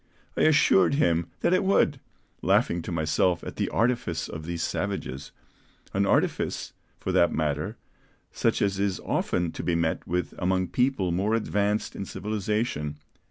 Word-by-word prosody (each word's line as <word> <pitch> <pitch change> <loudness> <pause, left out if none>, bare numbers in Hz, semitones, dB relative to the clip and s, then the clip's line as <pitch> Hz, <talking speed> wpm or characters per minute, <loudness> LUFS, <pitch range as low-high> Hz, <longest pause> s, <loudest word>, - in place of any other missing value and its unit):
I - - 0
assured 145 -7 +5
him 85 - +2
that - - +3
it 185 - +3
would, 170 -7 +3 0.4
laughing 85 - +2
to 85 - -6
myself 85 +2 +1
at - - -7
the - - 0
artifice 115 -9 0
of 80 0 -7
these 85 -1 -2
savages; 65 +2 -3 0.6
an 100 +1 +2
artifice, - - 0 0.3
for - - -2
that 85 - +4
matter, 75 -1 -1 0.5
such - - +1
as 100 -1 0
is 100 -2 0
often 85 -2 -1
to - - -6
be 85 - 0
met 85 -1 -1
with 90 +1 -1
among 95 0 +1
people 115 -3 +1
more 100 +6 +1
advanced 105 -1 0
in 100 - -4
civilization." 105 -8 -2
90 Hz, 155 wpm, -27 LUFS, 85-105 Hz, 0.6 s, assured